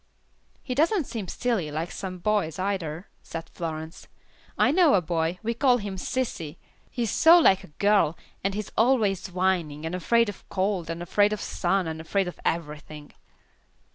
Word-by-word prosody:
"He 255 - -3
doesn't 325 - +2
seem 225 -7 -6
silly, 215 -7 -1
like 160 +3 -3
some 185 -2 -5
boys, 190 -4 0
either," 185 -3 -3
said 165 0 -7
Florence. 160 -1 -6 0.5
"I 255 - +4
know 330 - +5
a - - +5
boy, 165 0 -1
we 230 +1 0
call 250 +1 +3
him 205 -4 -5
'sissy,' 180 - -3 0.3
he 240 - -2
is 220 - -1
so 330 +2 +7
like 195 - +5
a - - -11
girl, 200 -6 +3 0.3
and 195 0 0
he 210 - -1
is 210 - -12
always 220 -6 +2
whining, 175 -5 0
and 165 - -3
afraid 230 +6 +2
of 205 - -8
cold, 190 -3 -1
and 165 +1 -4
afraid 205 +4 +3
of 210 - -3
sun, 185 -1 0
and 160 0 -4
afraid 190 +4 0
of 180 - -7
everything." 150 -2 -4
190 Hz, 175 wpm, -26 LUFS, 165-215 Hz, 0.5 s, so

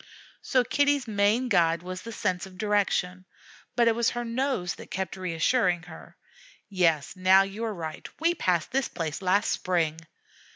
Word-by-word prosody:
So 255 -1 +2
Kitty's 285 +1 +1
main 215 +4 +2
guide 170 -6 +2
was 185 0 -6
the 230 - -8
sense 185 -5 -2
of 185 -1 -15
direction, 195 -3 0 0.5
but 235 -1 +3
it 230 - +5
was 230 0 +1
her 240 0 -4
nose 235 -6 -1
that - - -12
kept 190 +1 -3
reassuring 180 +1 +1
her, 175 -2 -13 0.5
"Yes, 170 -7 +1
now 190 +1 +5
you 195 +3 -6
are 220 -2 -3
right 160 -3 -6
we 335 +2 +2
passed 180 - 0
this 270 0 0
place 160 -2 -4
last 190 +2 +2
spring." 165 -4 0
190 Hz, 165 wpm, -27 LUFS, 175-230 Hz, 0.5 s, it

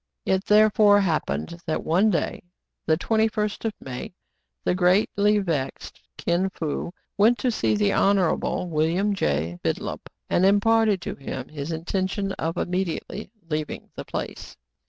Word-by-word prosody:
It 190 +1 +1
therefore 210 -1 +6
happened 155 - -1
that 155 - -1
one 185 +7 +3
day, 170 -6 -1 0.5
the 160 - +4
21st 220 +2 0
of 220 - 0
May, 130 +6 -7 0.5
the - - +2
greatly 200 +3 +3
vexed 165 -9 -3 0.2
Kin 175 +3 0
Fo 165 -2 -4 0.3
went 230 +4 +5
to 250 - 0
see 110 - +1
the 105 -1 +2
Honorable 190 -2 +2
William 170 +6 +1
J. 80 - -1
Bidulph, - - -2 0.3
and 175 - +2
imparted 205 0 +4
to - - -4
him 130 -1 -6
his 150 +1 -5
intention 190 +4 -2
of 165 +1 -2
immediately 185 +3 -3 0.2
leaving 155 -1 -4
the - - -5
place. - - -6
185 Hz, 135 wpm, -25 LUFS, 155-205 Hz, 0.5 s, therefore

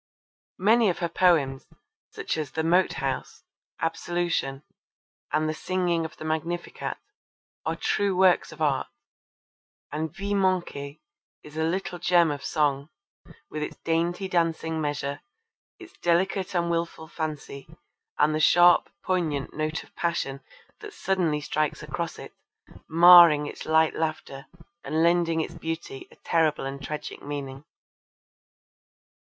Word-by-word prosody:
Many 220 +2 +4
of 175 - -1
her 170 -2 -2
poems, 155 -7 +2 0.4
such - - -4
as 155 -3 -3
The 160 - -1
Moat 175 +3 +3
House, 135 -1 -4 0.4
Absolution, 165 -4 -2 0.7
and 155 +1 +1
The 155 - -1
Singing 175 0 -1
of 160 - -9
the 155 - -8
Magnificat 165 +2 -3 0.7
are - - 0
true 200 -2 0
works 185 -1 +4
of 160 - -5
art, 140 -3 +1 1.0
and 155 +1 -3
Vies 200 +3 -4
Manquees 175 -7 -1 0.5
is 150 0 -13
a 160 - -1
little 175 +1 -2
gem 175 -2 +4
of 145 -1 -5
song, 145 -2 0 0.6
with 155 - -4
its 150 - -4
dainty 170 +3 0
dancing 165 -2 0
measure, 145 -1 -3 0.6
its 355 -1 -13
delicate 185 +2 0
and 170 -1 +1
wilful 165 -1 -3
fancy 155 -4 -6 0.5
and 150 +1 +3
the 155 - 0
sharp 175 +3 +5
poignant 160 -7 -1
note 155 +1 -2
of - - -23
passion 155 -5 -2 0.4
that 420 -1 -10
suddenly 170 -6 0
strikes 150 0 -2
across - - -4
it, - - -10 0.6
marring 170 -2 +8
its - - -8
light 160 0 +4
laughter 155 -3 -4 0.4
and 160 +1 0
lending 170 -1 +2
its - - -5
beauty 165 -4 -6
a - - -18
terrible 160 -4 +1
and 135 +1 -5
tragic 150 +2 -6
meaning. 140 -1 -6
160 Hz, 135 wpm, -26 LUFS, 150-175 Hz, 1.0 s, marring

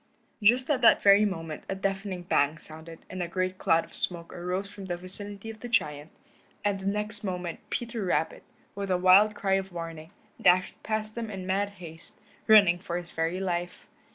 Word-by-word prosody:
Just 245 +5 +4
at 265 -3 +1
that 235 - +6
very 200 +1 +7
moment 165 -6 -4
a 195 - -1
deafening 195 -1 -3
bang 150 -3 +2
sounded, 160 +1 -11
and 185 0 -6
a 175 - -2
great 185 +1 -2
cloud 165 -3 +3
of - - -20
smoke 170 -2 -4
arose 180 +3 -3
from 200 -1 -9
the 175 -2 -3
vicinity 200 +4 -1
of 220 - -13
the 245 - -7
giant, 150 -8 0 0.6
and 200 -1 +1
the 190 - -5
next 210 +1 -3
moment 180 -3 -4
Peter 235 -2 -3
Rabbit, 160 -3 0 0.3
with 200 -1 -5
a 185 - +2
wild 190 +4 +6
cry 195 -2 0
of 190 0 -13
warning, 165 -2 -7 0.3
dashed 180 0 +3
past 215 0 -3
them 230 -1 -5
in 190 -3 -6
mad 195 +2 0
haste, 165 -2 -12 0.3
running 200 -5 +7
for 175 -2 -4
his 175 -1 -7
very 165 +3 -1
life. 175 -2 -3
185 Hz, 190 wpm, -28 LUFS, 175-205 Hz, 0.6 s, very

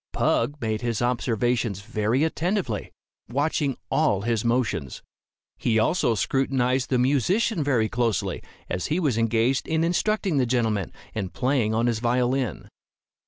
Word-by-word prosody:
Pug 145 +1 +1
made 110 -3 -2
his 120 -3 -1
observations 120 -3 0
very 110 +5 0
attentively, 160 - -1 0.4
watching 140 +1 0
all 135 -9 +2
his 115 -1 0
motions. 115 - -1 0.6
He 115 -2 +1
also 115 +1 +2
scrutinized 130 +1 0
the 130 - +2
musician 150 - +2
very 125 -6 +2
closely, 115 -2 -1 0.3
as 90 - -2
he 155 +5 0
was 145 -9 +1
engaged 115 +3 +1
in 160 0 +1
instructing 185 0 +1
the 130 -2 +2
gentleman, 115 -6 0 0.2
and 95 -4 -3
playing 125 -4 0
on 115 +1 +2
his 115 -2 +1
violin. 125 - 0
125 Hz, 135 wpm, -25 LUFS, 115-140 Hz, 0.6 s, all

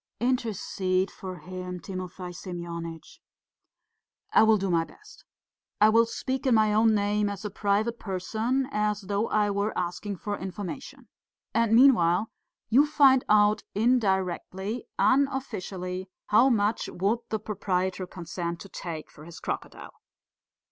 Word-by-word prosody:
"Intercede 200 -6 0
for 185 -1 -8
him, 180 0 -7
Timofey 185 -1 -7
Semyonitch!" 170 -2 -7 1.1
"I - - +7
will 220 0 +5
do 195 -1 -1
my 165 -1 +3
best. 425 - -16 0.5
I 215 - +7
will 230 +1 +4
speak 260 +3 -3
in 250 - +5
my 215 -1 +4
own 220 +1 +4
name, 205 0 +1
as 200 +1 -6
a 210 - -3
private 210 +3 0
person, 220 +7 -1
as 210 -2 0
though 200 +3 -1
I 210 -1 +1
were 200 +2 -1
asking 180 +3 -3
for 205 +3 -4
information. 210 +8 -7 0.5
And 230 0 +3
meanwhile, 220 -7 +5 0.4
you 275 +6 +5
find 275 -4 +5
out 210 0 +5
indirectly, 200 -2 0
unofficially, 200 -9 0 0.2
how 235 +6 +6
much 215 -2 +1
would 200 +6 0
the 220 - 0
proprietor 190 -3 -2
consent 170 -1 -5
to 195 - -10
take 165 -4 -7
for 150 - -14
his 170 0 -10
crocodile?" - - -6
205 Hz, 135 wpm, -27 LUFS, 185-225 Hz, 1.1 s, I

